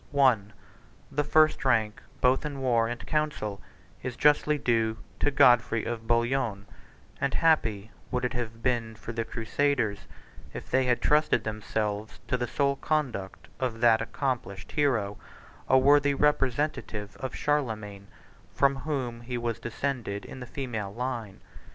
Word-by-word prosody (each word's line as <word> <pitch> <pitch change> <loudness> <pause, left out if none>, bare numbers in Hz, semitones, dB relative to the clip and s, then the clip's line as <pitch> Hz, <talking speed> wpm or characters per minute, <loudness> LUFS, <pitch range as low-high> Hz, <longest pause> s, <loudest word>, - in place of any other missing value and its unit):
I. 130 -4 +6 0.7
The 145 +2 0
first 155 +1 +3
rank 110 -5 +1 0.2
both 130 +1 +3
in 145 -2 -4
war 120 -3 +2
and 120 0 -5
council 150 -10 -2 0.4
is 130 -2 -4
justly 150 +1 +3
due 115 -4 +1 0.2
to - - +2
Godfrey 120 -4 +4
of 115 -1 -4
Bouillon; 120 -3 +1 0.5
and 140 0 0
happy 115 -10 +2 0.2
would 125 0 -1
it 125 - -2
have 115 -2 -5
been 115 -3 0
for 115 - -7
the 115 0 -1
crusaders, 115 -1 -1 0.5
if - - -8
they 130 0 +3
had 125 -1 +1
trusted 150 -6 +3
themselves 110 0 -3
to 130 - +2
the 125 -1 -2
sole 140 +2 +1
conduct 130 -13 -2
of 125 -3 -2
that 115 -2 +5
accomplished 115 -6 -3
hero, 120 -9 0 0.5
a 130 - +6
worthy 145 +1 +5
representative 135 -7 0
of 130 - -5
Charlemagne, 110 -9 -2 0.5
from 140 -1 +3
whom 130 -4 -3
he 120 +1 -4
was 120 -1 -2
descended 115 -3 -3
in - - -9
the 125 - -7
female 115 -8 -4
line. 115 -3 -4
120 Hz, 145 wpm, -28 LUFS, 110-140 Hz, 0.7 s, I